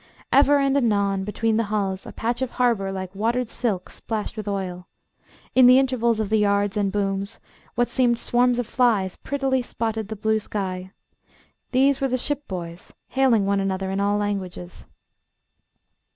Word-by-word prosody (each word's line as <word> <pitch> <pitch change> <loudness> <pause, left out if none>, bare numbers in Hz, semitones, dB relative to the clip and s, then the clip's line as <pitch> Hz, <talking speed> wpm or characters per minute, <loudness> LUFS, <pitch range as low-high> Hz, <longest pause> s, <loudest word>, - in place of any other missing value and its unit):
Ever 285 +1 +5
and 275 -1 +2
anon, 200 -6 +1
between 220 +2 0
the 230 - +1
hulls, 195 -3 -2
a - - -7
patch 240 +2 -2
of 260 - 0
harbour 230 -6 +1
like 190 -1 -5
watered 230 +4 -1
silk 205 -8 -2
splashed 215 -2 -5
with 215 -2 -6
oil. 185 -3 -4 0.7
In 255 -1 +7
the 255 +1 +8
intervals 240 -4 +2
of 215 -2 -1
the 220 0 +3
yards 200 0 +1
and 200 -2 0
booms, 200 0 -2 0.4
what 240 0 +2
seemed 245 -2 +2
swarms 245 +1 +2
of 245 - -1
flies 215 -6 +1
prettily 270 -2 -1
spotted 225 -3 -3
the 220 - -5
blue 220 +1 +1
sky. 190 -3 -4 0.8
These 270 +2 +3
were 270 - +2
the 255 0 0
shipboys, 185 -12 -5 0.2
hailing 255 -6 +3
one 200 0 +1
another 190 0 -2
in 195 - -1
all 200 +1 +1
languages. 190 -4 -4
215 Hz, 165 wpm, -23 LUFS, 195-245 Hz, 0.8 s, the